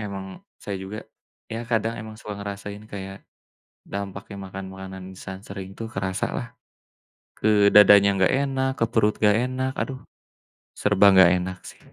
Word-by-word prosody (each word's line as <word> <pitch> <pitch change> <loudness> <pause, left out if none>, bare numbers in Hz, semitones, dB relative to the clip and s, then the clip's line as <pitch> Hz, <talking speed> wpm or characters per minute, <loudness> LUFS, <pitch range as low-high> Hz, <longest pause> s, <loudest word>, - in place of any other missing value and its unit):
Emang 100 -2 -5 0.4
saya 100 - -4
juga 100 +3 -6 0.5
ya 115 - -3
kadang 115 0 +1
emang 110 0 -9
suka 105 -1 -7
ngerasain 100 +1 -6
kayak, 95 -1 -6 0.8
dampaknya 100 0 -6
makan 95 0 -7
makanan 95 0 -8
instan 95 0 -8
sering 95 -1 -7
tuh 115 - -4
kerasalah. 95 0 -2 0.9
Ke 105 -1 +4
dadanya 100 -1 +8
enggak 95 +6 +3
enak, 135 -1 0
ke 115 - +3
perut 105 -2 +3
enggak 105 0 +5
enak, 130 +1 -2
aduh, 130 -1 -4 0.8
serba 100 -1 +4
enggak 95 -2 +8
enak 90 0 -5
sih. - - -16
100 Hz, 145 wpm, -24 LUFS, 95-110 Hz, 0.9 s, dadanya